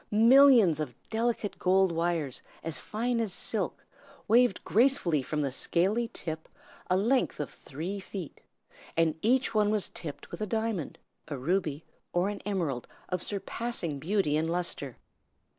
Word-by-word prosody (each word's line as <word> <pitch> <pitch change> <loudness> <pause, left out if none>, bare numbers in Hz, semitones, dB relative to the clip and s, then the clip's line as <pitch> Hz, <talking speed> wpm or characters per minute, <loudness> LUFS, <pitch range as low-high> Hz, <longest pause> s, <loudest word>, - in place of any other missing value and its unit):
Millions 230 - +6
of 135 -6 -4 0.2
delicate 225 -2 -1
gold 190 0 +3
wires 165 -5 -1 0.2
as 165 -1 -2
fine 235 +2 -1
as 225 -4 -1
silk - - -2 0.4
waved 235 -1 +4
gracefully 220 - +3
from 150 +3 -2
the 135 - -1
scaly 195 - +1
tip 160 -1 -5 0.4
a 185 - +3
length 235 +2 +1
of 150 - -3
three 170 +9 -6
feet, 190 -4 -8 0.6
and 165 -1 +3
each 255 +4 +2
one 210 -1 +3
was 210 -2 +1
tipped 150 -4 -7
with - - -7
a 215 - -1
diamond, 220 -7 -2 0.3
a 145 - -4
ruby, 155 +1 -1 0.3
or 180 +3 +2
an 205 -1 -5
emerald 165 -11 -2 0.2
of 180 -1 -1
surpassing 200 -6 -3
beauty 170 -1 +1
and 160 +1 0
lustre. 170 -7 -2
185 Hz, 145 wpm, -29 LUFS, 160-220 Hz, 0.6 s, Millions